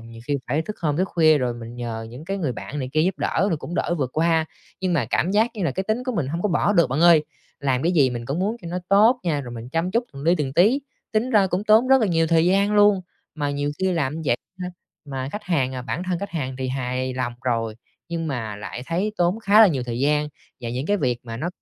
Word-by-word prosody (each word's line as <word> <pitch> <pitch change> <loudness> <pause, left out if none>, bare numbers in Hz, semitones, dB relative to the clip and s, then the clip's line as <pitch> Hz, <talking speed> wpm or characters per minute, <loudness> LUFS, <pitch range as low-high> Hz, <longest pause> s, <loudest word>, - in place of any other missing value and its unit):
nhiều 115 0 -12
khi 145 - +1
phải 150 +5 +1
thức 215 - -6
hôm, 150 -4 0
thức 185 +3 0
khuya 155 -3 +4
rồi 125 -3 -1
mình 115 0 -9
nhờ 115 -2 -5
những 125 +6 -10
cái 195 +3 -3
người 150 -9 -1
bạn 145 +5 -7
này 130 - -3
kia 155 - +2
giúp 185 +2 0
đỡ 195 - +1
rồi 165 - +1
cũng 170 - -7
đỡ 175 - 0
vượt 130 -3 -1
qua. 160 0 +2 0.4
Nhưng 185 -2 0
mà 145 -8 +1
cảm 175 - +1
giác 220 +4 +3
như 205 - -4
là - - +1
cái 190 - -3
tính 220 +4 -1
của 255 - 0
mình 160 - -1
hông 165 +5 -3
có 210 - +1
bỏ 190 +3 +2
được 170 -5 +4
bạn 135 - 0
ơi, 170 -3 +6 0.4
làm 130 -2 0
cái 175 +2 +2
gì 140 -6 +4
mình 120 -1 -5
cũng 140 +4 -2
muốn 210 +5 0
cho 170 - -6
nó 180 +1 -2
tốt 220 +6 +5
nha, 155 -5 0
rồi 120 -3 -8
mình 115 +1 -8
chăm 165 +5 -1
chút 235 +3 +1
từng 140 - -9
li 170 +4 +4
từng 135 -3 -2
tí. 210 - +4 0.3
Tính 220 +4 +1
ra 210 -5 +4
cũng 185 +2 -2
tốn 220 +4 +5
rất 265 0 +6
là 220 - +2
nhiều 165 -2 +2
thời 165 0 +3
gian 200 +3 +3
luôn, 205 -2 +5 0.3
mà 145 -2 -2
nhiều 145 0 -1
khi 190 -1 +1
làm 160 -1 -1
vậy 120 -4 +2 0.2
ha, 180 - -3 0.4
mà 135 -2 -4
khách 210 - -5
hàng, 135 -8 0
à, 125 - -4
bản 165 +7 -3
thân 180 -2 -1
khách 200 0 -5
hàng 130 -7 -3
thì 130 -1 -2
hài 130 0 -2
lòng 125 -1 -2
rồi 115 -3 -1 0.3
nhưng 165 -1 -3
mà 115 -7 -4
lại 110 +3 -7
thấy 190 +6 -1
tốn 180 +5 +1
khá 210 +1 +5
là 220 - +10
nhiều 135 -6 -1
thời 120 0 -3
gian, 150 +1 +2 0.3
và 120 -1 -4
những 130 +4 -3
cái 205 - +2
việc 125 -9 0
mà 115 -1 -6
nó 155 +9 -2
160 Hz, 280 wpm, -23 LUFS, 130-190 Hz, 0.4 s, là